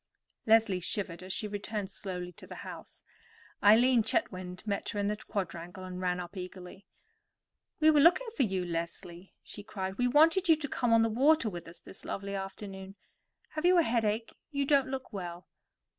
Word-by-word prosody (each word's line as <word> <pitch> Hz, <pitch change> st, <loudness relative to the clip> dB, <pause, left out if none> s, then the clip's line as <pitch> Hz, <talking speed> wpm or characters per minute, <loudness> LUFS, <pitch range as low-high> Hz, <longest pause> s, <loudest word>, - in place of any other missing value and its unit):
Leslie 220 Hz, -4 st, +4 dB
shivered 175 Hz, -1 st, -3 dB
as 185 Hz, +1 st, -7 dB
she 210 Hz, -, -2 dB
returned 205 Hz, -1 st, -4 dB
slowly 180 Hz, -3 st, -5 dB
to 170 Hz, -, -14 dB
the -, -, -9 dB
house. -, -, -10 dB, 0.6 s
Eileen 235 Hz, +4 st, +6 dB
Chetwynd 185 Hz, -, -2 dB
met 200 Hz, -2 st, -2 dB
her 205 Hz, -, -3 dB
in 200 Hz, -, 0 dB
the 210 Hz, +1 st, 0 dB
quadrangle 185 Hz, -4 st, -5 dB
and 185 Hz, 0 st, -6 dB
ran 180 Hz, -1 st, 0 dB
up 180 Hz, +3 st, -7 dB
eagerly. 185 Hz, +1 st, -9 dB, 0.9 s
"We 315 Hz, 0 st, +6 dB
were 300 Hz, -, +4 dB
looking 340 Hz, +10 st, +5 dB
for -, -, 0 dB
you, 190 Hz, -6 st, 0 dB
Leslie," 170 Hz, +1 st, -6 dB
she 205 Hz, -, -9 dB
cried. 190 Hz, -1 st, -5 dB
"We 245 Hz, -, +3 dB
wanted 325 Hz, +7 st, +4 dB
you 320 Hz, -, +8 dB
to 300 Hz, -2 st, -4 dB
come 245 Hz, -3 st, 0 dB
on 230 Hz, 0 st, +6 dB
the 225 Hz, -, +2 dB
water 265 Hz, +1 st, +3 dB
with 175 Hz, -2 st, -8 dB
us 170 Hz, -, -11 dB
this -, -, -12 dB
lovely 200 Hz, 0 st, -4 dB
afternoon. 195 Hz, 0 st, -6 dB, 0.5 s
Have 310 Hz, -, -5 dB
you 360 Hz, +1 st, +5 dB
a 340 Hz, -, +6 dB
headache? 225 Hz, -2 st, 0 dB, 0.2 s
You 280 Hz, -2 st, -1 dB
don't 275 Hz, -2 st, +3 dB
look 260 Hz, -3 st, -5 dB
well." 175 Hz, -2 st, -6 dB
205 Hz, 185 wpm, -31 LUFS, 185-245 Hz, 0.9 s, you